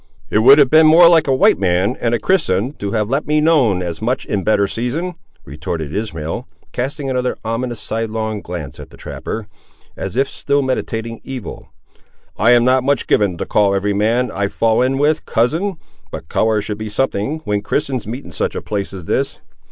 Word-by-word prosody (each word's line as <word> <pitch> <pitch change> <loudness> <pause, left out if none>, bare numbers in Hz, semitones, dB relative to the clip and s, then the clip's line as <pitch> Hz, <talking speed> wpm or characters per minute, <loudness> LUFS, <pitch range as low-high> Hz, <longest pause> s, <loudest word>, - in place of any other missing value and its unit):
"It 105 - +3
would 135 +6 +8
have 140 -4 +4
been 160 0 +7
more 165 +2 +8
like 165 -3 +4
a 135 - +3
white 130 - +4
man 95 +4 +1
and 120 0 +1
a - - -2
Christian, 125 - +1
to 100 -1 -4
have 105 -2 0
let 140 +6 -1
me 150 0 +2
known 135 - +3
as 85 0 -5
much 125 +4 -1
in 100 -2 -2
better 100 -1 +2
season," 125 - -3 0.3
retorted 75 +2 -5
Ishmael, 80 -8 -4 0.2
casting 135 +3 -3
another 125 -1 -1
ominous 115 +1 -3
sidelong 110 -1 -3
glance 85 -7 -7
at - - -10
the - - -16
trapper, 110 -2 -6 0.5
as - - -5
if 135 +1 +2
still 140 0 -1
meditating 115 -3 -3
evil. 130 -4 -7 0.7
"I 110 +4 +2
am 120 -1 +5
not 130 0 +3
much 140 -1 +1
given 100 -4 +1
to - - -3
call 100 -2 +2
every 100 +1 0
man, 115 +5 +1
I 100 0 -1
fall 115 +3 +1
in 130 +1 +1
with, 150 +2 +1
cousin, 160 - 0 0.3
but 75 - -8
colour 110 -2 +1
should 105 0 -5
be 110 0 -5
something, 135 +5 -1
when 105 -1 -1
Christians 130 +1 -2
meet 125 +6 -6
in - - -10
such - - -2
a - - -3
place 100 -2 -3
as 95 -3 -7
this. - - -1
115 Hz, 200 wpm, -18 LUFS, 100-135 Hz, 0.7 s, would